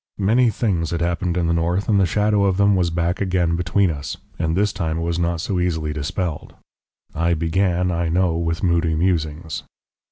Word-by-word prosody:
Many 115 +5 +3
things 95 -7 -1
had 85 - -2
happened 85 +1 -1
in 85 - +1
the 85 - +1
north, 85 +4 0
and 105 -3 +3
the 95 - +3
shadow 105 +2 +2
of 95 -2 +1
them 100 0 +4
was 90 -2 +1
back 85 +2 -1
again 90 -3 +1
between 90 +2 +1
us, 70 -3 -5 0.2
and 80 +1 0
this 105 0 +1
time 80 -4 -2
it - - -2
was 85 0 -1
not 85 -1 0
so 95 0 -1
easily 80 -4 -1
dispelled. 80 +2 -4 0.6
I 85 +2 +1
began, 90 +2 +1
I 85 -1 -1
know, 90 0 +1
with 85 0 -2
moody 85 -2 +2
musings. 80 -2 -1
85 Hz, 195 wpm, -21 LUFS, 85-95 Hz, 0.6 s, them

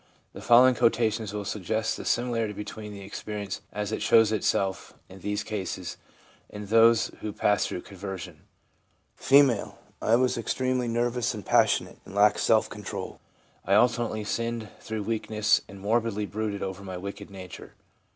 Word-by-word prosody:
The - - -9
following 125 +2 +6
quotations 110 -2 +1
will 105 -1 -4
suggest 110 +2 -1
the - - -8
similarity 115 -3 0
between 105 +1 -7
that 100 - -9
experience 100 0 -5
as 105 0 -3
it 110 - -3
shows 110 -1 +5
itself 95 -2 -1
in 95 - -12
these 105 +2 -2
cases, 95 -4 -5 0.5
and 105 0 -7
in 100 - -11
those 115 0 +5
who 105 - -3
pass 105 0 +1
through 90 - -5
conversion: 95 -3 -8 0.8
F. - - -8 0.5
' - - -32
I 110 - +4
was 125 -1 +2
extremely 130 +1 -1
nervous 120 +1 0
and 105 - -8
passionate, - - +2
and 95 - -12
lacked 105 0 +4
self - - +3
control. - - -7 0.4
I 100 - +2
alternately 115 -1 +2
sinned 115 0 -3
through 110 -2 -4
weakness, 110 0 +1
and 100 - -11
morbidly 110 0 0
brooded 105 +1 -3
over 95 0 -5
my 95 -2 -6
wicked 100 +2 -7
nature. 95 -2 -10
105 Hz, 160 wpm, -27 LUFS, 100-115 Hz, 0.8 s, following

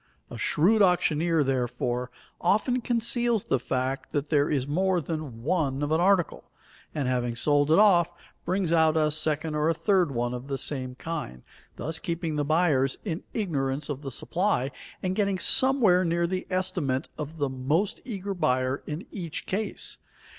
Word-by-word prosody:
A - - -6
shrewd 205 +8 +3
auctioneer, 165 -3 +3
therefore, 125 -1 -1 0.3
often 245 +5 +2
conceals 235 -1 0
the 135 - 0
fact 130 +2 -3
that 145 0 -1
there 145 -2 +2
is 140 -3 0
more 185 +4 +1
than 150 -8 -5
one 145 -3 0
of 145 - -2
an 160 +2 +3
article, 185 -2 +1 0.5
and 145 -4 -1
having 125 -2 -1
sold 145 +3 +2
it 160 - +5
off, 175 -5 +5 0.3
brings 180 -1 0
out 160 -1 +4
a 155 -1 +2
second 155 0 0
or 150 +1 +1
a 165 - +1
third 185 -2 +2
one 120 -1 -1
of 125 +2 -6
the 135 -1 -2
same 130 -3 -3
kind, 140 - -6 0.3
thus 160 +1 -4
keeping 165 -2 -3
the 145 - 0
buyers 145 -4 +2
in 170 -4 -3
ignorance 145 - -1
of 145 -1 -4
the 140 - -5
supply 155 - 0 0.3
and 185 0 -1
getting 200 -2 +1
somewhere 220 -5 +4
near 170 0 +1
the 185 +1 -3
estimate 180 -8 -1
of 155 +2 -6
the 145 -2 0
most 140 +9 -1
eager 200 -5 -4
buyer 130 -6 0
in 155 +5 -5
each 170 -6 -5
case. 210 +3 -2
155 Hz, 170 wpm, -27 LUFS, 135-185 Hz, 0.5 s, it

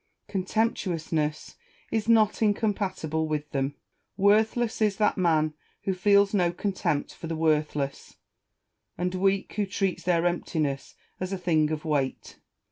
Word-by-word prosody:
Contemptuousness 180 -7 -1 0.3
is 220 0 -1
not 220 -2 +4
incompatible 195 -7 0
with 150 -1 -3
tliem: 135 +1 -1 0.4
worth 210 +4 +4
less 235 -2 -1
is 210 -2 +3
that 210 - +2
man 160 -4 +2 0.3
who 195 - 0
feels 200 +2 +4
no 180 -4 +3
contempt 180 -5 -2
for 165 - -8
the 165 - -3
worthless, 150 -3 -1 0.8
and 180 +1 -1
weak 195 +1 +1
who 210 - +2
treats 195 -1 -1
their 175 -1 +1
emptiness 155 -5 -1 0.2
as 185 +1 -3
a 195 - -1
thing 160 -4 +2
of 155 0 -4
weight. 145 -4 -2
180 Hz, 135 wpm, -27 LUFS, 155-200 Hz, 0.8 s, not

